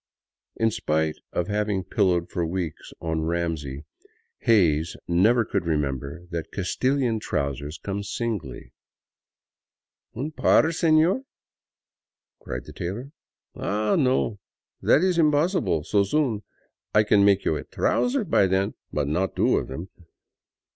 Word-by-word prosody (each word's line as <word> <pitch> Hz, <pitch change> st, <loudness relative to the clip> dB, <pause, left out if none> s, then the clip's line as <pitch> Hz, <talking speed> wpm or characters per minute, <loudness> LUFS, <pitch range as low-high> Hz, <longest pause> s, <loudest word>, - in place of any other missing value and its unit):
In 115 Hz, 0 st, +2 dB
spite 80 Hz, -5 st, 0 dB
of 90 Hz, -, -1 dB
having 105 Hz, -2 st, 0 dB
pillowed 90 Hz, -3 st, +1 dB
for 85 Hz, -, -1 dB
weeks 85 Hz, -1 st, -4 dB
on 80 Hz, -1 st, -1 dB
Ramsey, 80 Hz, -4 st, -2 dB, 0.5 s
Hays 85 Hz, -, +3 dB
never 110 Hz, +7 st, +4 dB
could 100 Hz, -5 st, -2 dB
remember 70 Hz, +1 st, -2 dB
that 85 Hz, -2 st, -4 dB
Castilian 125 Hz, +4 st, 0 dB
trousers 70 Hz, -3 st, -3 dB
come 100 Hz, 0 st, -4 dB
singly. 100 Hz, -, -4 dB, 0.7 s
" -, -, -53 dB
Un 140 Hz, +7 st, -3 dB
par, -, -, +4 dB
sefior! 165 Hz, +7 st, +3 dB, 0.6 s
" -, -, -68 dB
cried -, -, -6 dB
the -, -, -11 dB
tailor, 110 Hz, +11 st, -5 dB, 0.3 s
" -, -, -51 dB
Ah, 105 Hz, +1 st, 0 dB
no, 130 Hz, -6 st, +1 dB, 0.4 s
that 155 Hz, -, +4 dB
is 185 Hz, -2 st, +2 dB
impossible 150 Hz, -, +2 dB
so 100 Hz, +5 st, +2 dB
soon. 115 Hz, -1 st, 0 dB, 0.5 s
I 105 Hz, -, +6 dB
can 105 Hz, -1 st, +4 dB
make 100 Hz, -1 st, +4 dB
you 80 Hz, -, +2 dB
a 75 Hz, -, -4 dB
trouser 245 Hz, 0 st, 0 dB
by 100 Hz, -, +3 dB
then, 95 Hz, +1 st, +1 dB, 0.2 s
but 75 Hz, -2 st, -1 dB
not 90 Hz, +6 st, -1 dB
two -, -, +3 dB
of -, -, -2 dB
them. 80 Hz, +8 st, -7 dB
100 Hz, 135 wpm, -25 LUFS, 80-120 Hz, 0.7 s, I